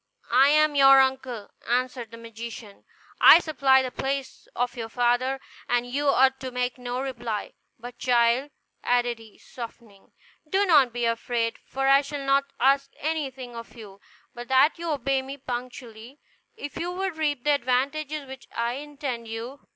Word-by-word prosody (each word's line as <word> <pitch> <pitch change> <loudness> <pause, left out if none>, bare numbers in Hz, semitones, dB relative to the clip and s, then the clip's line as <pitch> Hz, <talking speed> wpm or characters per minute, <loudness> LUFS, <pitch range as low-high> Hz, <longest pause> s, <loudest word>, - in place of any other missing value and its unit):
"I 265 +3 +7
am 305 0 +4
your 270 -1 +7
uncle," 265 -5 -1 0.2
answered 245 -1 -1
the 230 - -11
magician; 230 -2 -10 0.3
"I - - +10
supply 270 -5 +3
the 255 - -4
place 270 0 -4
of 245 +1 -1
your 225 -2 -5
father, 245 +3 +1 0.3
and 245 0 +1
you 280 +4 -2
ought 265 -1 +4
to 260 -1 -5
make 250 0 -3
no 245 0 -4
reply. 240 -5 -4 0.2
But 240 +1 -10
child," 245 +2 +2 0.3
added 245 -1 +1
he, 220 -2 -16
softening, 230 -4 -11 0.4
"do 390 +4 +2
not 290 -9 +5
be 240 0 -2
afraid; 230 0 -1
for 270 0 -2
I 275 +1 +6
shall 285 -1 -6
not 275 0 +3
ask 275 +1 +3
anything 270 -6 -4
of 230 +1 -10
you, 200 -3 -12 0.3
but 240 0 -8
that 265 +5 +4
you 340 0 -4
obey 275 -2 0
me 270 +1 -8
punctually, 245 0 -8 0.4
if 290 -8 -7
you 340 +1 -3
would 375 -1 -3
reap 290 -5 -1
the 295 - +3
advantages 280 +3 -1
which 265 -1 -11
I 235 +2 -1
intend 280 -5 -6
you. 230 +5 -8
260 Hz, 165 wpm, -25 LUFS, 240-275 Hz, 0.4 s, I